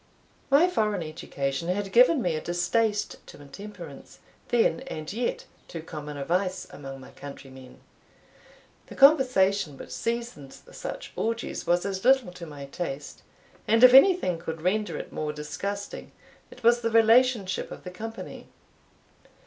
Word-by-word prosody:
My 285 +6 +6
foreign 210 - 0
education 150 -2 -4
had 195 +2 -2
given 250 +4 +5
me 175 - +1
a 155 - -3
distaste 205 +5 0
to - - -13
intemperance, 200 +9 -11 0.3
then 240 0 +2
and 155 -3 -6
yet 235 +2 -2 0.2
too 165 -2 -7
common 150 -2 -7
a 140 - -4
vice 185 +2 -1
among 135 -1 -9
my 130 - -13
countrymen. 130 -2 -11 1.1
The - - -11
conversation 205 - +4
which - - -10
seasoned 230 - -4
such - - -8
orgies 230 +1 -3
was 175 +1 +2
as 190 -1 -3
little 255 -6 +4
to 175 -2 -9
my 145 -2 -8
taste, 140 -1 -6 0.5
and 225 +2 +4
if 255 0 +10
anything 270 - +6
could 160 -1 -6
render 205 0 0
it - - -8
more 150 -1 -2
disgusting, 200 +7 -6 0.4
it 250 - -15
was 240 +1 +5
the 230 - 0
relationship 225 -3 +3
of - - -10
the 180 - -7
company. 225 +5 -8
195 Hz, 145 wpm, -27 LUFS, 155-230 Hz, 1.1 s, if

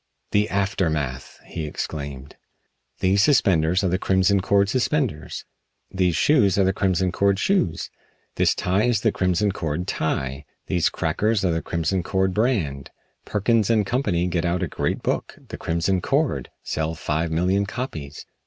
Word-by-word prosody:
"The 105 +1 +2
aftermath!" 80 - -2
he 80 -2 -5
exclaimed. 70 -2 -6 0.7
"These 95 +2 +3
suspenders 90 - +3
are - - +2
the 90 +2 0
Crimson 95 +1 +2
Cord 100 +1 +3
suspenders. 125 - -1 0.5
These 90 -3 +1
shoes 105 - +3
are 100 - +4
the 95 0 +2
Crimson 95 -2 +1
Cord 100 +1 +2
shoes. 185 - 0 0.4
This - - +2
tie 95 +5 +1
is 120 -4 +1
the 110 - +2
Crimson 95 +2 +1
Cord 85 -1 -3
tie. 70 -4 -2 0.2
These 90 -3 +1
crackers 100 +6 0
are 90 - +2
the 80 0 -1
Crimson 85 +3 -1
Cord 95 +1 0
brand. 95 - 0 0.4
Perkins 110 +1 +1
& 105 - +1
Co. 125 +6 0
get 90 -6 0
out 85 +1 0
a - - 0
great - - -2
book, - - -2
'The - - -6
Crimson 85 +3 0
Cord!' - - 0
Sell 80 +1 -2
five 80 +1 -1
million 95 +5 +1
copies. 80 - -6
95 Hz, 155 wpm, -23 LUFS, 80-100 Hz, 0.7 s, are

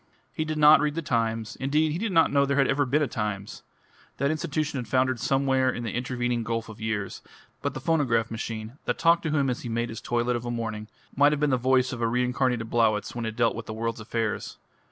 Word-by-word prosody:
He 155 - -2
did 155 0 -3
not 150 +1 +8
read 150 0 0
the 165 - -2
Times: 115 -4 -1
indeed, 150 +3 +1
he 165 - -2
did 220 0 -1
not 165 -3 +4
know 140 -1 +4
there 140 0 +1
ever 135 +1 +2
had - - -8
been 150 +4 +3
a - - 0
Times 105 -5 -4 0.6
that 140 +2 +1
institution 155 -2 -2
had 120 - -6
foundered 130 -1 +1
somewhere 135 0 +2
in 120 -2 -3
the 115 - -3
intervening 120 -1 -1
gulf 115 0 -3
of 110 0 -11
years; 110 -3 -3 0.4
but - - -2
the - - -3
phonograph 130 -7 +1
machine, 115 +3 -5
that - - -1
talked 170 0 +4
to 160 - -2
him 145 -2 +1
as 125 -2 -2
he 120 - -6
made 115 +1 -1
his 115 - -7
toilet 120 +1 0
of 120 - -3
a 120 - -4
morning, 115 -2 -4 0.3
might 145 +2 +5
have 150 - -1
been 150 -1 +2
the - - +4
voice 130 0 +2
of 120 - -5
a 115 - +2
reincarnated 125 0 0
Blowitz 110 -2 +1
when 120 -2 -3
it 110 - -5
dealt 115 -1 +2
with 115 -1 -7
the 110 - -5
world's 115 +1 -3
affairs. 110 0 -3
125 Hz, 240 wpm, -26 LUFS, 115-140 Hz, 0.6 s, not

